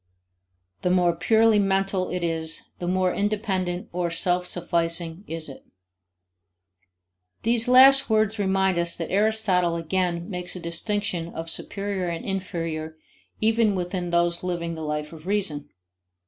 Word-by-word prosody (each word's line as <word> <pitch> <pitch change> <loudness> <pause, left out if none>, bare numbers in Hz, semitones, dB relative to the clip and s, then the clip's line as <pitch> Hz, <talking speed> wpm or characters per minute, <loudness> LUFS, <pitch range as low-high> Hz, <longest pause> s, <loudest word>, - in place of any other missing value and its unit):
The 180 - 0
more 180 -2 +3
purely 220 +4 +4
mental 195 -1 +1
it 180 -1 -3
is, 160 -1 -2
the 175 - -4
more 185 0 +1
independent 195 -4 -1
or 175 0 -1
self 180 +1 0
sufficing 170 0 0
is 165 0 -4
it. 135 - -11 1.8
These 230 +1 +2
last 265 +2 +7
words 215 0 +2
remind 190 -2 +2
us 170 0 0
that 165 - -5
Aristotle 195 -4 +2
again 170 +1 -1
makes 180 -2 -5
a - - -5
distinction 175 +1 -2
of 165 0 -4
superior 195 -1 -4
and 170 -1 -4
inferior 165 -5 -4 0.4
even 220 -1 +3
within 180 0 -3
those 170 0 +1
living 170 -2 -2
the 160 - -7
life 150 0 -3
of 160 +2 -12
reason. 185 -8 -1
180 Hz, 135 wpm, -25 LUFS, 170-200 Hz, 1.8 s, last